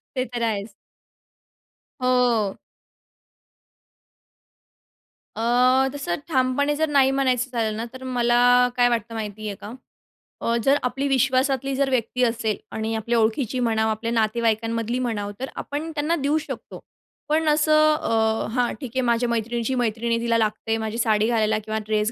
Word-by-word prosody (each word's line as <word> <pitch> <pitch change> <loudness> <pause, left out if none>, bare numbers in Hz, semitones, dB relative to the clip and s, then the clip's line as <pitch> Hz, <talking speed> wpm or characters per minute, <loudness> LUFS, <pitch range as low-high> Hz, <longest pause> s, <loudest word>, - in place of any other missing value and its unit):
ते 255 -1 0
तर 240 - -3
आहेच. 210 -2 -2 1.3
हो. 245 -5 +2 2.8
अ, 250 +3 +3
तसं 275 -12 -2
ठामपणे 275 +1 +1
जर 315 +1 0
नाही 270 -2 +4
म्हणायचं, 265 -1 +1
झालं 220 -3 -1
ना, 230 - -3
तर 260 0 -10
मला 245 0 +3
काय 245 0 +5
वाटतं 230 -1 -2
माहिती 215 -1 -5
आहे 200 - -4
का, 205 - -8 0.7
अ, 235 - 0
जर 275 +4 +4
आपली 260 +3 -1
विश्वासातली 265 0 +1
जर 275 0 +1
व्यक्ती 250 0 0
असेल 225 -3 0 0.2
आणि 220 +1 -2
आपल्या 230 +2 -1
ओळखीची 230 +3 0
म्हणावं, 220 -2 +1
आपल्या 230 +2 -3
नातेवाईकांमधली 230 +1 0
म्हणावं, 210 -5 -2
तर 265 - -4
आपण 305 +3 -5
त्यांना 305 +2 0
देऊ 290 0 0
शकतो. 310 - -7 0.5
पण 315 +1 +1
असं 310 0 +4
अ, 220 -5 0
हां, 245 -1 +1
ठीक 250 -4 -6
आहे, 260 - +2
माझ्या 235 -1 +1
मैत्रिणीची 235 +2 -1
मैत्रीण, 230 -1 0
तिला 230 -1 +1
लागते 225 0 -1
माझी 220 0 -4
साडी 220 -2 +2
घालायला 220 -2 +1
किंवा 215 +1 -3
ड्रेस 215 +1 0
240 Hz, 145 wpm, -23 LUFS, 220-260 Hz, 2.8 s, काय